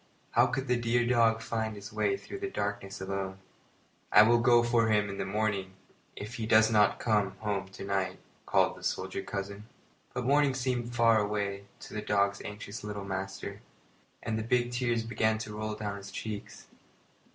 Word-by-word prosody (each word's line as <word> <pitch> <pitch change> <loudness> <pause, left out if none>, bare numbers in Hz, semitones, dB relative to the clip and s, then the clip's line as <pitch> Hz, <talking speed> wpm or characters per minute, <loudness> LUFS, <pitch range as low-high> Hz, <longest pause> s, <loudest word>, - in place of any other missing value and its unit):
How - - +5
could 135 0 -2
the 125 0 +2
dear 120 +1 +2
dog 115 -2 +3
find 110 -1 -2
his 100 +1 -9
way 395 - +1
through 395 - -8
the 390 0 -3
darkness 100 - -3
alone? 95 0 -3 0.7
"I 105 - +9
will 120 +2 +5
go 120 0 +5
for 120 -1 +3
him 105 -2 +2
in 100 - -7
the - - -1
morning, 100 -2 -1 0.4
if 105 +3 -7
he 110 -2 -3
does 110 0 +5
not 105 -1 +4
come 105 -4 +1
home 100 -3 -2
to 95 - -9
night," 100 -1 -1 0.3
called - - +3
the - - -14
soldier 95 +1 -2
cousin. 100 +2 -5 0.5
But 125 -1 -2
morning 140 0 +4
seemed 125 -2 -1
very 120 +1 -7
far 115 -2 +5
away 100 -1 -2 0.2
to - - -10
the 105 - -3
dog's 100 -1 +1
anxious 105 +2 -7
little 105 -1 -5
master, 95 0 -5 0.6
and 110 0 -1
the - - -2
big 120 +1 +1
tears 120 -2 0
began 110 -1 +1
to 110 -1 -6
roll 110 0 -3
down 105 -1 -4
his 100 0 -9
cheeks. 105 +1 -6
110 Hz, 185 wpm, -30 LUFS, 100-120 Hz, 0.7 s, I